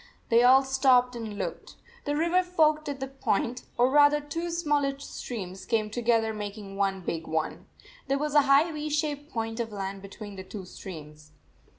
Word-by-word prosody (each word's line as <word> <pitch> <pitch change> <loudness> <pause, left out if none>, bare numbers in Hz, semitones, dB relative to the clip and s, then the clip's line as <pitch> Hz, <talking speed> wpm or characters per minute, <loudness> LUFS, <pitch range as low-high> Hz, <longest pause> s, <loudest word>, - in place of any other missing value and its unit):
They 230 0 +5
all 260 +2 +7
stopped 260 -2 +3
and 220 -3 -6
looked. - - -5 0.3
The 290 0 0
river 340 +4 +3
forked 310 -4 +2
at 280 -1 -4
that 270 0 -7
point, 245 +4 0
or 245 +2 +4
rather 290 +1 +6
two 330 +4 -4
smaller 295 -5 0
streams 195 -9 -7
came 215 -2 0
together 225 -1 +1
making 205 -1 -6
one 195 -1 0
big 165 -2 -4
one. 160 0 -3 0.4
There 275 0 +1
was 300 +1 -2
a 295 - +7
high 290 +5 +5
V 305 0 -4
shaped 295 -1 -2
point 225 0 -3
of 230 -2 -2
land 195 -1 -5
between 200 +1 -9
the 190 - -6
two 190 0 -8
streams. 150 -5 -10
245 Hz, 180 wpm, -28 LUFS, 200-290 Hz, 0.4 s, all